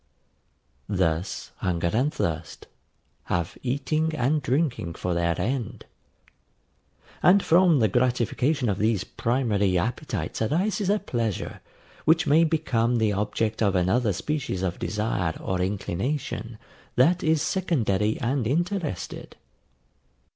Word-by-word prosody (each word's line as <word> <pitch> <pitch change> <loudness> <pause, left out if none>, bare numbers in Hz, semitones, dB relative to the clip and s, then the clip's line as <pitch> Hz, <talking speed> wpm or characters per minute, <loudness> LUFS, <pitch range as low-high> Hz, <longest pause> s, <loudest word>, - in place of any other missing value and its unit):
Thus, 90 -2 -1
hunger 85 -2 -1
and 130 +7 +2
thirst 80 - -3 0.6
have 85 -2 -2
eating 155 +5 -1
and 150 +3 +1
drinking 125 - -1
for 90 - -2
their 85 -1 0
end; 120 -3 -3 1.4
and 195 +2 +5
from 175 -1 +5
the 110 -4 +4
gratification 125 +4 +1
of 100 -2 0
these 110 -2 +1
primary 105 -6 0
appetites 110 +4 -3
arises 185 - 0
a 205 - +4
pleasure, 115 - -3 0.4
which 160 +1 +4
may 155 +4 +5
become 125 -7 +1
the 110 -3 +2
object 105 +2 -1
of 100 -3 +2
another 100 +6 +2
species 125 - -2
of 90 -2 -2
desire 105 -6 -1
or 95 -1 -2
inclination 105 - -3 0.4
that 170 +8 +4
is 160 -1 +2
secondary 110 - 0
and 125 -1 0
interested. 170 - -2
115 Hz, 115 wpm, -25 LUFS, 95-150 Hz, 1.4 s, and